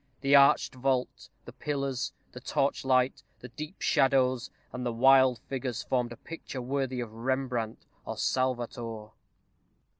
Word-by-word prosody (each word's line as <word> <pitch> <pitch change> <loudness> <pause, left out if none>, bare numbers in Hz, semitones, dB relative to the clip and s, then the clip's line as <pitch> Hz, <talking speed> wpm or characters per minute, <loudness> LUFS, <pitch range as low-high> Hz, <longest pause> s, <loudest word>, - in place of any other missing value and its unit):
The 140 +1 +4
arched 140 0 +5
vault, 130 0 -1 0.2
the - - -10
pillars, 140 -3 -2 0.2
the 125 - -9
torchlight, 135 -1 +1 0.2
the 125 - -9
deep 155 +8 -8
shadows, 130 -2 +3 0.2
and 125 - -4
the 120 - -1
wild 130 +1 +5
figures, 130 -3 -3
formed 125 -2 -1
a 120 - -8
picture 165 -5 -8
worthy 130 0 -2
of 115 -2 -6
Rembrandt 120 -1 -2 0.2
or - - -6
Salvator. 120 -4 -2
130 Hz, 130 wpm, -29 LUFS, 120-135 Hz, 0.2 s, arched